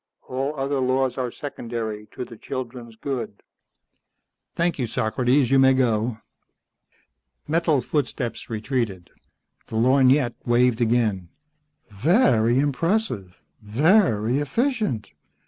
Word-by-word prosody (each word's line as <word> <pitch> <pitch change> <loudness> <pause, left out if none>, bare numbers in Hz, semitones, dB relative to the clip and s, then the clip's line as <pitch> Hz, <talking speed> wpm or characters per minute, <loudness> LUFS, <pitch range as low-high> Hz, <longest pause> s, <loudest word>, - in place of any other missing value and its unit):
All 135 +3 -2
other 135 0 -1
laws 130 0 +1
are 125 -1 -1
secondary 115 -6 -5
to 125 - -4
the 115 - -12
children's 120 -1 -7
good." 115 -4 -5 1.1
"Thank 170 -2 0
you, 125 - 0
Socrates. 125 +5 +1
You 135 - +5
may 135 0 +5
go." 115 -2 +1 1.3
Metal 160 -3 +2
footsteps 125 -4 -3
retreated. 110 -5 -3 0.6
The - - -7
lorgnette 130 +2 +4
waved 120 0 +2
again. 110 -6 +1 0.6
"Very 120 - +3
impressive. 140 - -1 0.2
Very 125 - +2
efficient. 215 - -1
125 Hz, 100 wpm, -23 LUFS, 115-140 Hz, 1.3 s, You